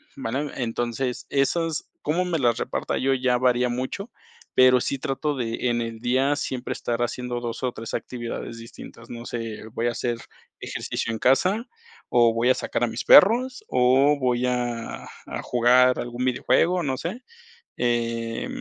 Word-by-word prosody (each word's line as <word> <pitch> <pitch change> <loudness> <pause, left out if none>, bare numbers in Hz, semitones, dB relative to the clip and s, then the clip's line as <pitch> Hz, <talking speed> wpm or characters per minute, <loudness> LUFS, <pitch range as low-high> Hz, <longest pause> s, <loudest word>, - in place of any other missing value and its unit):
¿vale? 140 +6 -3
Entonces, 120 +1 -2
esas, 160 +3 0
cómo 170 +5 0
me 170 -3 -1
las 120 -3 +2
reparta - - -2
yo 135 +1 +2
ya 125 -1 +2
varía 125 0 +2
mucho, 130 - -4 0.5
pero 130 -1 +6
sí 140 - -1
trato 140 +3 -2
de 120 -1 -2
en 120 0 0
el 115 -1 -5
día 130 +4 +2
siempre 130 -3 -4
estar 120 0 -3
haciendo 120 0 -3
2 120 +1 -5
o 125 - 0
3 115 0 -7
actividades 120 -1 -5
distintas, 115 0 -12
no 120 0 -7
sé, 115 -2 -5
voy 115 +1 -2
a - - +1
hacer 120 0 -2 0.4
ejercicio 115 - -3
en 110 - -4
casa, 185 - +3 0.5
o 120 -2 +4
voy 115 +2 +2
a 130 - +5
sacar - - -2
a 120 - +3
mis - - -4
perros, 250 +6 +6
o 130 +3 +4
voy 125 -1 +1
a 120 -2 -3 0.2
a - - -4
jugar 125 +1 +4
a - - 0
algún 120 +1 -4
videojuego, 165 +8 +2
no 135 -4 -1
sé, 205 - -5 0.5
eh, 115 -1 -1
125 Hz, 170 wpm, -24 LUFS, 120-135 Hz, 0.5 s, pero